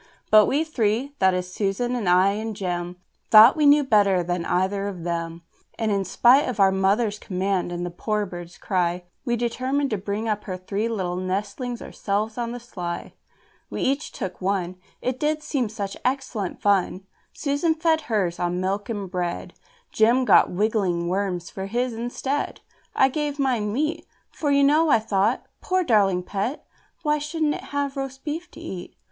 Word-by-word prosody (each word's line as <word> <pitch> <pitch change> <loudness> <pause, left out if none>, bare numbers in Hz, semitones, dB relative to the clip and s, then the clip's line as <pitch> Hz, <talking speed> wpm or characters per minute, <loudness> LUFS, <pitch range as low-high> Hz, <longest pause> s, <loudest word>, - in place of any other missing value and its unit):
But 215 -1 +7
we 295 +4 +2
three 255 -2 -1
that 190 -1 +4
is 180 0 -4
Susan 215 +6 -1
and 215 -7 -1
I 185 +2 +5
and 215 +1 -4
Jem 175 -3 -3 0.3
Thought 220 +3 +9
we 300 -2 +3
knew 290 +1 +6
better 200 -7 +3
than 175 0 -2
either 195 +2 0
of 185 -4 -6
them: 170 -1 -3 0.3
And 220 -2 0
in 195 -1 0
spite 245 +9 +4
of 230 -4 -4
our 195 -1 +6
mother's 205 +3 +1
command 190 -1 -1
and 175 0 -3
the 175 - -4
poor 210 +4 -1
bird's 175 -2 -9
cry, 180 -2 -1 0.2
We 240 -2 +1
determined 255 +4 -1
to 215 - -1
bring 205 +3 -3
up 210 -1 -2
her 185 -3 -4
three 200 +4 -2
little 185 -5 -2
nestlings 205 +6 -3
ourselves 215 +3 -2
on 235 -1 -2
the 245 - -5
sly. 180 -8 -6 0.6
We - - -3
each 275 +3 0
took 190 -5 -6
one, 185 -1 -1 0.3
It 255 0 -1
did 305 0 0
seem 255 -8 -1
such 200 -2 -5
excellent 255 -7 -2
fun! 195 -1 +1 0.3
Susan 295 +3 0
fed 320 0 +2
hers 190 -6 0
on 175 0 -1
milk 195 +3 -2
and 205 -4 -3
bread, 175 - -3 0.4
Jem 235 +4 +3
got - - +5
wriggling 185 -4 0
worms 185 -2 -2
for 190 0 -5
his 240 +3 -1
instead. 245 +5 -3 0.3
I 265 - +5
gave 295 +1 -2
mine 245 -7 0
meat, 310 +7 -2 0.2
For, 295 - -2
you 280 0 +4
know, 305 +3 +4
I - - +6
thought, 215 +1 0 0.2
"Poor 370 0 +1
darling 200 - +3
pet! 205 - -3 0.4
why 300 -1 +2
shouldn't 300 0 -1
it - - -6
have 285 -1 -2
roast 270 -1 -5
beef 330 +3 -4
to - - -13
eat?" 190 - -7
210 Hz, 180 wpm, -24 LUFS, 185-265 Hz, 0.6 s, Thought